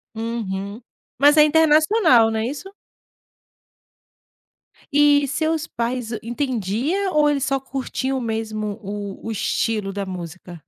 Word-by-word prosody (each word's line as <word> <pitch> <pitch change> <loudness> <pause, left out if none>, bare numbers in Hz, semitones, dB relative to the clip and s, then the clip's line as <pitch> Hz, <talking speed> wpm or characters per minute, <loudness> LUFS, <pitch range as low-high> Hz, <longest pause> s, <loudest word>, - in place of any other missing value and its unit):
Uhum. 220 -2 -4 0.4
Mas 290 +2 +6
é 300 - +9
internacional, 310 - +4
não 220 - -1
é 220 - -1
isso? 290 +8 -6 2.2
E 290 -1 +4
seus 315 +3 -1
pais 235 0 -3
entendiam 255 - -2
ou 300 -1 +4
eles 280 -2 0
só 275 -2 0
curtiam 265 0 -3
mesmo 220 -2 -3
o 205 +1 -5 0.2
o - - -2
estilo 215 -1 -1
da 200 -1 -3
música? 175 -2 -8
240 Hz, 120 wpm, -21 LUFS, 215-295 Hz, 2.2 s, é